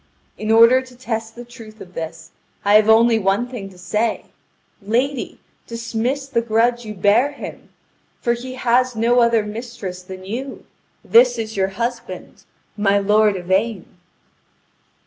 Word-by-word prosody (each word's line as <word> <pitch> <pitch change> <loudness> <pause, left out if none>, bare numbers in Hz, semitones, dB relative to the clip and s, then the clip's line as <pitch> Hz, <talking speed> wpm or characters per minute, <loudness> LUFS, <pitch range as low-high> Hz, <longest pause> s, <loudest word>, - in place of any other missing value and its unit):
In 215 - -5
order 230 +3 +6
to 255 -1 -15
test 225 -2 -5
the 240 0 -9
truth 225 -3 -13
of 180 - -12
this, 160 -1 -7 0.3
I 205 - +4
have 215 +1 +6
only 225 0 +5
one 200 +4 0
thing 235 -6 -7
to 185 - -17
say: 215 +5 -2 0.6
lady, 245 +6 -2 0.3
dismiss 235 +4 -3
the 235 -4 0
grudge 235 +1 +1
you 215 -1 -7
bear 215 +9 +3
him! - - -9 0.5
For 235 - +1
he 255 +2 -7
has 250 0 +1
no 235 +2 +2
other 235 -2 +3
mistress 210 -4 -7
than 185 0 -10
you. 255 +7 -6 0.4
This 245 +1 +5
is 220 -1 -5
your 190 -1 +1
husband, 235 -6 -5 0.3
my 200 -1 +2
lord 210 +1 +3
Yvain." 190 +3 -1
225 Hz, 145 wpm, -20 LUFS, 205-240 Hz, 0.6 s, order